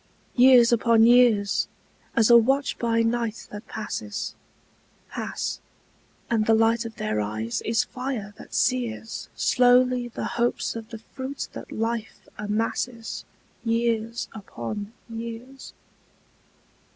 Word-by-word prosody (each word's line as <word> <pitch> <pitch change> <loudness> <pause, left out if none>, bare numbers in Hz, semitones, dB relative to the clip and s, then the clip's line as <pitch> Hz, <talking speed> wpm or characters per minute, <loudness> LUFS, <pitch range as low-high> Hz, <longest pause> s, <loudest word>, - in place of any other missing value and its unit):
Years 250 -2 +7
upon 230 -1 +4
years, 235 -4 +4 0.5
as 230 0 +4
a - - +9
watch 270 +5 +3
by 230 -1 +2
night 230 -1 -1
that 210 +2 -8
passes, 110 - -4 0.8
Pass, - - -3 0.7
and 220 -2 +1
the 225 - +6
light 225 +1 +3
of 225 -1 -7
their 105 0 -1
eyes 110 +2 -3
is 225 0 +2
fire 250 -6 -5
that - - -10
sears 240 -3 -1
Slowly 250 0 +4
the 235 - -5
hopes 240 0 -1
of 225 0 -7
the 230 - -7
fruit 260 +5 -6
that - - -9
life 225 -2 -3
amasses 225 +2 -2 0.4
Years 230 0 0
upon 205 - -6 0.2
years. 235 +3 -8
230 Hz, 115 wpm, -25 LUFS, 220-240 Hz, 0.8 s, a